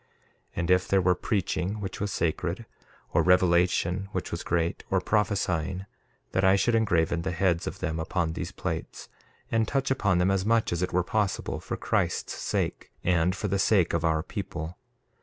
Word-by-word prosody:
1:4 -, -, -38 dB, 0.5 s
And 85 Hz, +1 st, 0 dB
if 90 Hz, 0 st, +3 dB
there 100 Hz, -, +3 dB
were 90 Hz, 0 st, +4 dB
preaching 100 Hz, +1 st, -1 dB
which 95 Hz, -2 st, -5 dB
was 100 Hz, -1 st, -1 dB
sacred, 80 Hz, -4 st, -1 dB, 0.5 s
or -, -, +4 dB
revelation 90 Hz, +1 st, +3 dB
which 95 Hz, -, -3 dB
was 85 Hz, -, -3 dB
great, 85 Hz, 0 st, -1 dB
or -, -, +2 dB
prophesying, 95 Hz, -4 st, 0 dB, 0.5 s
that 95 Hz, -, +1 dB
I 95 Hz, +1 st, +6 dB
should 120 Hz, +4 st, +2 dB
engraven 85 Hz, -7 st, +2 dB
the 95 Hz, -, -2 dB
heads 90 Hz, -1 st, +1 dB
of -, -, -6 dB
them 80 Hz, +1 st, -2 dB
upon 80 Hz, 0 st, -1 dB
these -, -, -4 dB
plates, -, -, -5 dB, 0.4 s
and 115 Hz, -1 st, +2 dB
touch 135 Hz, +1 st, 0 dB
upon 100 Hz, -8 st, +2 dB
them 90 Hz, +2 st, +3 dB
as 95 Hz, -1 st, +1 dB
much 110 Hz, -2 st, +2 dB
as 85 Hz, -, -2 dB
it 90 Hz, -, -1 dB
were 90 Hz, 0 st, +2 dB
possible, 105 Hz, +1 st, -1 dB
for -, -, -5 dB
Christ's -, -, -1 dB
sake, -, -, -2 dB
and 90 Hz, +1 st, +2 dB
for 105 Hz, -, -2 dB
the 100 Hz, 0 st, 0 dB
sake 95 Hz, -3 st, +3 dB
of 85 Hz, -1 st, 0 dB
our 80 Hz, -1 st, +1 dB
people. 85 Hz, -4 st, -5 dB
90 Hz, 185 wpm, -27 LUFS, 85-100 Hz, 0.5 s, I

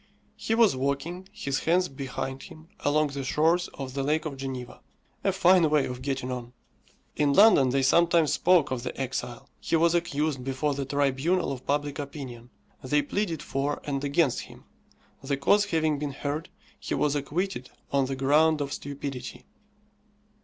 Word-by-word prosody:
He 220 Hz, +1 st, -1 dB
was 225 Hz, -, +4 dB
walking, 140 Hz, +8 st, -3 dB
his 140 Hz, -11 st, -2 dB
hands 180 Hz, +2 st, +3 dB
behind 135 Hz, -1 st, -5 dB
him, 155 Hz, +1 st, -13 dB
along 150 Hz, +1 st, +2 dB
the 140 Hz, -1 st, -5 dB
shores 165 Hz, +6 st, +2 dB
of 130 Hz, -2 st, -6 dB
the 140 Hz, -, -2 dB
Lake 150 Hz, +4 st, 0 dB
of 150 Hz, -3 st, -4 dB
Geneva. 130 Hz, -2 st, -6 dB, 0.4 s
A -, -, +3 dB
fine 175 Hz, -2 st, +4 dB
way 150 Hz, -2 st, +3 dB
of 125 Hz, 0 st, -6 dB
getting 135 Hz, -1 st, -3 dB
on! 125 Hz, -1 st, -6 dB, 0.6 s
In 145 Hz, -1 st, +2 dB
London 195 Hz, -9 st, +6 dB
they 135 Hz, +1 st, +1 dB
sometimes 170 Hz, +2 st, +4 dB
spoke 175 Hz, -6 st, +3 dB
of 130 Hz, -2 st, -2 dB
the 125 Hz, +2 st, -6 dB
exile. 125 Hz, -2 st, -4 dB
He -, -, -1 dB
was 165 Hz, +1 st, +3 dB
accused 155 Hz, -5 st, -1 dB
before 135 Hz, +3 st, -1 dB
the 140 Hz, 0 st, -3 dB
tribunal 145 Hz, +6 st, +1 dB
of 130 Hz, -1 st, -7 dB
public 145 Hz, 0 st, -1 dB
opinion. 130 Hz, -5 st, -7 dB, 0.3 s
They 145 Hz, +3 st, +2 dB
pleaded 170 Hz, 0 st, -2 dB
for 140 Hz, +2 st, -2 dB
and 140 Hz, -1 st, -3 dB
against 140 Hz, -1 st, +2 dB
him. -, -, -11 dB, 0.6 s
The 140 Hz, 0 st, -2 dB
cause 205 Hz, +9 st, +3 dB
having 160 Hz, -6 st, 0 dB
been 145 Hz, -1 st, -3 dB
heard, 145 Hz, +4 st, -4 dB, 0.3 s
he -, -, -3 dB
was 150 Hz, -1 st, +1 dB
acquitted 145 Hz, 0 st, -3 dB, 0.2 s
on 140 Hz, -1 st, +2 dB
the 135 Hz, -, -3 dB
ground 150 Hz, +4 st, +3 dB
of 140 Hz, -1 st, -3 dB
stupidity. 140 Hz, -2 st, -6 dB
145 Hz, 165 wpm, -27 LUFS, 135-160 Hz, 0.6 s, London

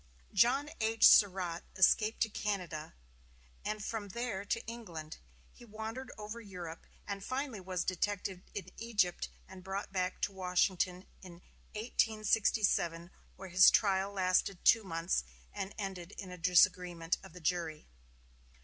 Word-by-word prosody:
John 265 Hz, +9 st, +3 dB
H. 225 Hz, 0 st, +5 dB
Surratt 185 Hz, -4 st, +4 dB
escaped 215 Hz, +3 st, +3 dB
to 220 Hz, -, +3 dB
Canada, 180 Hz, -, -4 dB, 0.7 s
and 215 Hz, 0 st, -3 dB
from 220 Hz, -3 st, -4 dB
there 230 Hz, -2 st, -3 dB
to 215 Hz, +3 st, -2 dB
England. 175 Hz, -10 st, -7 dB, 0.3 s
He 245 Hz, -, -16 dB
wandered 225 Hz, +3 st, -6 dB
over 215 Hz, +2 st, -7 dB
Europe, 180 Hz, -5 st, -8 dB, 0.2 s
and 200 Hz, -1 st, -4 dB
finally 255 Hz, -2 st, -3 dB
was 185 Hz, -2 st, -3 dB
detected 190 Hz, 0 st, -2 dB
in 200 Hz, -, -5 dB
Egypt 210 Hz, -7 st, 0 dB, 0.2 s
and 185 Hz, -1 st, -12 dB
brought 195 Hz, +2 st, -4 dB
back 185 Hz, -1 st, -1 dB
to 205 Hz, -, +1 dB
Washington 185 Hz, 0 st, 0 dB, 0.2 s
in 185 Hz, -2 st, -11 dB, 0.4 s
1867, 215 Hz, -6 st, +1 dB, 0.2 s
where 190 Hz, 0 st, -9 dB
his 185 Hz, +1 st, +8 dB
trial 195 Hz, -1 st, +2 dB
lasted 185 Hz, -1 st, +1 dB
two 225 Hz, -1 st, +6 dB
months, 165 Hz, -, -1 dB, 0.3 s
and 195 Hz, -, -5 dB
ended 190 Hz, -3 st, -5 dB
in 185 Hz, -3 st, -7 dB
a 180 Hz, -, -8 dB
disagreement 180 Hz, -1 st, +3 dB
of 190 Hz, -4 st, -13 dB
the 180 Hz, -, -10 dB
jury. 165 Hz, -2 st, -2 dB
190 Hz, 135 wpm, -33 LUFS, 180-215 Hz, 0.7 s, his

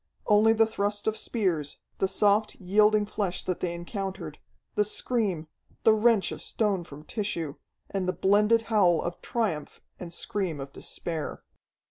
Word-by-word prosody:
Only 215 Hz, +1 st, +5 dB
the 225 Hz, 0 st, +5 dB
thrust 205 Hz, -1 st, -1 dB
of 220 Hz, -, +1 dB
spears, 185 Hz, -, -1 dB, 0.2 s
the 195 Hz, -, +2 dB
soft, 205 Hz, +2 st, +2 dB
yielding 210 Hz, +3 st, +3 dB
flesh 200 Hz, -3 st, -2 dB
that 185 Hz, -, -2 dB
they 175 Hz, -, -1 dB
encountered, 180 Hz, -3 st, -5 dB, 0.3 s
the 210 Hz, -, +3 dB
scream, 205 Hz, -6 st, -1 dB, 0.4 s
the 220 Hz, -, +7 dB
wrench 220 Hz, -2 st, +3 dB
of -, -, -6 dB
stone 205 Hz, -5 st, 0 dB
from 150 Hz, -2 st, -11 dB
tissue, 170 Hz, -6 st, -3 dB, 0.3 s
and 190 Hz, -2 st, -2 dB
the -, -, +1 dB
blended 210 Hz, +4 st, +3 dB
howl 200 Hz, -7 st, +3 dB
of 175 Hz, -, -4 dB
triumph 200 Hz, -11 st, -2 dB, 0.2 s
and 175 Hz, -2 st, -7 dB
scream 175 Hz, -3 st, -2 dB
of 135 Hz, 0 st, -7 dB
despair. 165 Hz, -3 st, -5 dB
200 Hz, 150 wpm, -28 LUFS, 175-215 Hz, 0.4 s, the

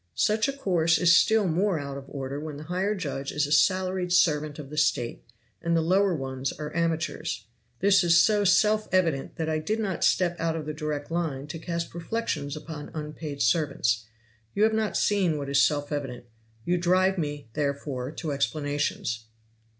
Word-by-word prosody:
Such 215 Hz, +3 st, +2 dB
a -, -, 0 dB
course 175 Hz, -11 st, +2 dB
is 170 Hz, -1 st, +5 dB
still 220 Hz, 0 st, +4 dB
more 180 Hz, +2 st, +1 dB
out 140 Hz, -2 st, -5 dB
of 140 Hz, -1 st, -8 dB
order 135 Hz, 0 st, -5 dB
when 150 Hz, -1 st, -6 dB
the 150 Hz, -, -8 dB
higher 185 Hz, +5 st, -1 dB
judge 140 Hz, -7 st, -4 dB
is 150 Hz, 0 st, +1 dB
a 145 Hz, -, -6 dB
salaried 185 Hz, +3 st, +2 dB
servant 155 Hz, -4 st, +2 dB
of 145 Hz, -2 st, -9 dB
the 150 Hz, -, -7 dB
State 120 Hz, -5 st, 0 dB, 0.4 s
and 170 Hz, 0 st, +1 dB
the -, -, +3 dB
lower 185 Hz, +3 st, +3 dB
ones 135 Hz, -2 st, -3 dB
are 150 Hz, +1 st, -7 dB
amateurs. 165 Hz, -, -1 dB, 0.4 s
This 195 Hz, 0 st, +5 dB
was 170 Hz, -2 st, +4 dB
so 210 Hz, +3 st, +4 dB
self 215 Hz, +3 st, +3 dB
evident 165 Hz, -7 st, +1 dB
that 160 Hz, -2 st, -3 dB
I 155 Hz, 0 st, 0 dB
did 215 Hz, +8 st, -2 dB
not 195 Hz, -5 st, -2 dB
step 175 Hz, -2 st, +3 dB
out 165 Hz, 0 st, 0 dB
of 160 Hz, -2 st, -4 dB
the 155 Hz, -, -4 dB
direct 150 Hz, -1 st, -4 dB
line 160 Hz, -5 st, -2 dB
to 165 Hz, -, -5 dB
cast 170 Hz, 0 st, -4 dB
reflections 170 Hz, -5 st, -3 dB
upon 155 Hz, -1 st, -8 dB
unpaid 150 Hz, -1 st, -4 dB
servants. 115 Hz, -4 st, +1 dB, 0.5 s
You 205 Hz, -, +3 dB
have 220 Hz, 0 st, +4 dB
not 220 Hz, -2 st, 0 dB
seen 190 Hz, -7 st, +2 dB
what 140 Hz, -1 st, -4 dB
is 140 Hz, 0 st, +4 dB
self 145 Hz, -1 st, +1 dB
evident 135 Hz, -5 st, -4 dB, 0.4 s
you 175 Hz, 0 st, +1 dB
drive 185 Hz, +2 st, +2 dB
me, 145 Hz, -5 st, -4 dB
therefore, 140 Hz, -3 st, -2 dB
to 160 Hz, 0 st, -4 dB
explanations. 140 Hz, -4 st, -1 dB
160 Hz, 185 wpm, -27 LUFS, 145-185 Hz, 0.5 s, is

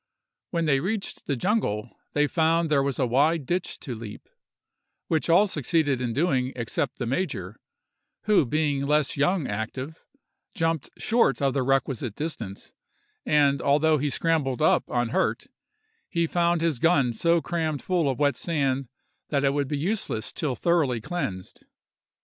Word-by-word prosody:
When 170 Hz, -2 st, -1 dB
they 140 Hz, -3 st, +3 dB
reached 195 Hz, +6 st, -4 dB
the 140 Hz, -, 0 dB
jungle, 125 Hz, -, -1 dB, 0.2 s
they 150 Hz, 0 st, +3 dB
found 165 Hz, +1 st, +1 dB
there 140 Hz, -2 st, +4 dB
was 135 Hz, -1 st, -1 dB
a 130 Hz, -, +2 dB
wide 145 Hz, +5 st, +2 dB
ditch 175 Hz, +6 st, -2 dB
to 135 Hz, -, -5 dB
leap, 110 Hz, -2 st, -9 dB, 0.8 s
which 160 Hz, +1 st, 0 dB
all 175 Hz, +5 st, +6 dB
succeeded 150 Hz, -, 0 dB
in 120 Hz, -2 st, -1 dB
doing 130 Hz, -2 st, 0 dB
except 115 Hz, -3 st, -2 dB
the 125 Hz, -, -3 dB
major, 115 Hz, -, -3 dB, 0.6 s
who 210 Hz, -6 st, +4 dB
being 145 Hz, 0 st, 0 dB
less 150 Hz, -1 st, +2 dB
young 160 Hz, +3 st, +1 dB
active, 130 Hz, +9 st, -5 dB, 0.5 s
jumped 165 Hz, -5 st, -1 dB
short 225 Hz, -, +2 dB
of 135 Hz, -2 st, +1 dB
the 135 Hz, -, 0 dB
requisite 130 Hz, -4 st, 0 dB
distance; 120 Hz, -11 st, -6 dB, 0.5 s
and 140 Hz, -2 st, +3 dB
although 150 Hz, +2 st, +3 dB
he 145 Hz, +2 st, 0 dB
scrambled 145 Hz, -4 st, 0 dB
up 155 Hz, -, +3 dB
unhurt, 120 Hz, -1 st, 0 dB, 0.6 s
he 170 Hz, -2 st, +1 dB
found 170 Hz, 0 st, +1 dB
his 165 Hz, -7 st, 0 dB
gun 140 Hz, -7 st, +3 dB
so 170 Hz, +7 st, +2 dB
crammed 160 Hz, -4 st, -2 dB
full 175 Hz, -6 st, +1 dB
of 130 Hz, -, -2 dB
wet 145 Hz, -2 st, +2 dB
sand 135 Hz, -5 st, -1 dB, 0.4 s
that 140 Hz, -2 st, +1 dB
it 140 Hz, 0 st, +3 dB
would 145 Hz, -1 st, 0 dB
be 145 Hz, -, -2 dB
useless 170 Hz, -, -2 dB
till 145 Hz, -6 st, -2 dB
thoroughly 150 Hz, -4 st, +1 dB
cleansed. 105 Hz, -, -5 dB
145 Hz, 155 wpm, -26 LUFS, 130-165 Hz, 0.8 s, all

